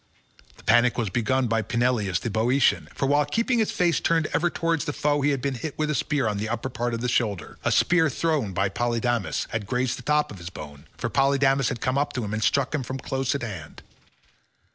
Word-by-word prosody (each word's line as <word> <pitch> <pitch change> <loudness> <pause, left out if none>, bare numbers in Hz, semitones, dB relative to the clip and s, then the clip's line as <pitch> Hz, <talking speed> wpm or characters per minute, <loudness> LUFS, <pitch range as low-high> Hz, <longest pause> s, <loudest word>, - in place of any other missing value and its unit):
The - - -17
panic 120 +1 +4
was 110 -6 -1
begun 125 +4 +1
by 115 0 +1
Peneleos 115 -4 0
the 115 - -3
Boeotian, 120 +6 +2
for - - -1
while 145 +2 +3
keeping 230 - 0
his 220 - +2
face 175 -2 +1
turned 165 -1 +1
ever 175 +2 +2
towards 165 -2 -1
the 145 - -2
foe 145 0 +1
he 145 - +2
had 140 -3 -1
been 140 -1 0
hit 140 +4 -6
with 155 0 0
a - - 0
spear 140 -2 0
on 105 -1 -1
the 110 +2 -3
upper 120 +3 -3
part 120 -1 -2
of 115 - -5
the 125 - -1
shoulder; 105 -8 -1
a - - +1
spear 175 -3 +3
thrown 145 -7 0
by 95 +2 +1
Polydamas 120 +1 -1
had 110 -3 -3
grazed 125 +2 -1
the - - -8
top 150 +4 +1
of 95 -4 -10
the 85 - -7
bone, 75 -4 -10
for 120 - -2
Polydamas 135 -1 +3
had 120 - -5
come 130 +2 +1
up 145 - -1
to 125 - -2
him 105 - -4
and 110 0 -1
struck 140 +1 +1
him 150 - 0
from 130 +1 -5
close 135 0 -2
at 140 - -3
hand. 95 -10 -7
125 Hz, 235 wpm, -25 LUFS, 115-145 Hz, -, panic